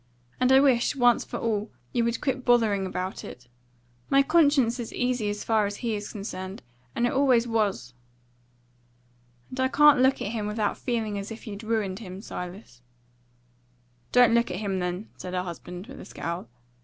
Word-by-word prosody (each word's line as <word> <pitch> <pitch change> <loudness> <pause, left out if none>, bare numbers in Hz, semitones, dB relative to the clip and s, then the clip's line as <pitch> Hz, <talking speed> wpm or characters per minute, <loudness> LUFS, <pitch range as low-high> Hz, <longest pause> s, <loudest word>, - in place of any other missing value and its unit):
And 255 +1 +3
I 265 - +8
wish, 265 -2 +3
once 245 -3 +4
for - - -6
all, 215 -2 -1 0.2
you 240 - +2
would 235 0 -1
quit 265 -2 -1
bothering 220 -6 +3
about 185 +1 -4
it. 125 0 -10 0.6
My 275 0 +5
conscience 285 -6 +3
is 235 - -5
easy 245 -4 -1
as 205 0 -4
far 220 -2 +2
as 205 - -5
he 230 - 0
is 205 -1 -4
concerned, 195 -2 -6 0.3
and 240 - +1
it 240 - 0
always 255 -4 +3
was." 200 - -1 1.6
"And 255 - -7
I 260 - +3
can't 295 0 +6
look 265 +1 +4
at 205 - -3
him 215 -3 -3
without 210 -1 -1
feeling 220 -4 -2
as 195 - -6
if 225 0 -9
you'd 205 -2 -7
ruined 215 -4 -1
him, 190 -4 -8
Silas." 180 - -8 1.3
"Don't 245 -2 +6
look 235 0 +3
at 180 - -3
him, 195 -2 -2
then," 180 +3 -3
said 185 0 -6
her 180 - 0
husband, 180 +1 -8
with 270 +3 -11
a - - -9
scowl. 170 -6 -5
220 Hz, 180 wpm, -26 LUFS, 195-245 Hz, 1.6 s, I